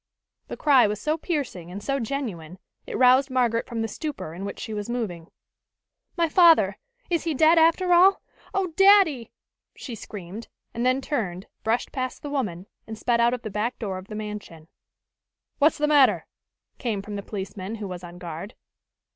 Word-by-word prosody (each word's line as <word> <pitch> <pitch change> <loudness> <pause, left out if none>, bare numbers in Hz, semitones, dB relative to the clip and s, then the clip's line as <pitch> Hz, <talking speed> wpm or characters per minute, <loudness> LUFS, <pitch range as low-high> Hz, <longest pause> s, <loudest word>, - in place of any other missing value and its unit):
The - - -7
cry 270 -6 +5
was 210 0 -3
so 305 +7 0
piercing 285 - -4
and 200 +3 -8
so 275 0 -1
genuine, 215 - -4 0.3
it - - -4
roused 260 +2 +5
Margaret 240 -3 +1
from 230 -2 -3
the - - -1
stupor 285 - -6
in 185 +4 -6
which 200 - -6
she 220 - -5
was 210 +1 -4
moving. 195 -9 -4 0.9
"My 335 -1 +3
father! 335 0 +5 0.3
He - - -4
is 335 - +1
dead, 320 +3 +6
after 340 +3 +4
all! 375 +3 +6 0.3
Oh, 380 -4 -1
daddy!" 390 - +5 0.4
she 250 - -8
screamed, 205 0 -8 0.3
and 235 - -3
then 255 +2 +2
turned, 200 - -3 0.2
brushed 225 +2 0
past 255 -1 -4
the 290 - -5
woman, 200 -11 -3 0.2
and 220 0 -7
sped 235 +1 +1
out 240 +1 +3
of 245 - -11
the 215 - -5
back 215 +5 -2
door 195 -5 -4
of 185 - -13
the 215 - -7
mansion. 210 -7 -7 0.9
"What's 300 +2 +4
the 300 - +1
matter?" 290 -3 +4 0.5
came 215 -6 -2
from 205 0 -7
the 200 - -4
policeman 195 0 -6
who 210 -2 -6
was 180 -1 -7
on 175 0 -10
guard. 175 +4 -7
230 Hz, 180 wpm, -25 LUFS, 200-285 Hz, 0.9 s, dead